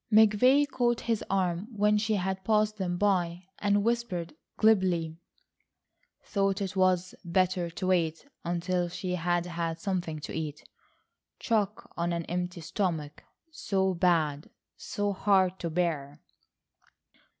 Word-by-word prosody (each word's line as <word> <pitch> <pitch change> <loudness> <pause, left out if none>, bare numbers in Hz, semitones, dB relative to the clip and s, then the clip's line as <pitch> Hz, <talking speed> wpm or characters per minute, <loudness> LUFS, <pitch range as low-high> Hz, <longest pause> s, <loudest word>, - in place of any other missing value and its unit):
McVay 220 +7 +5
caught 240 -3 0
his 230 -2 -1
arm 185 0 0
when 210 -1 +2
she 215 0 +1
had 190 0 -2
passed 215 0 +2
them 180 -3 -2
by, 180 -3 +1 0.2
and 205 0 +2
whispered 215 -8 -1 0.2
glibly: 180 -7 +2 1.0
"Thought 195 -1 0
it 195 -1 -3
was 185 -1 +2
better 180 0 +1
to 180 +3 -5
wait 170 - +1 0.2
until 175 +1 -1
she 180 +1 -4
had 175 0 0
had 170 -1 -3
something 175 -4 -2
to - - -6
eat—shock 195 - -5
on 170 0 -1
an 170 -1 -2
empty 180 0 -3
stomach, 160 -3 -3 0.3
so 190 -9 0
bad—so 170 +4 -1
hard 190 -2 +2
to 170 - -3
bear." 155 -4 -1
185 Hz, 120 wpm, -29 LUFS, 170-205 Hz, 1.0 s, McVay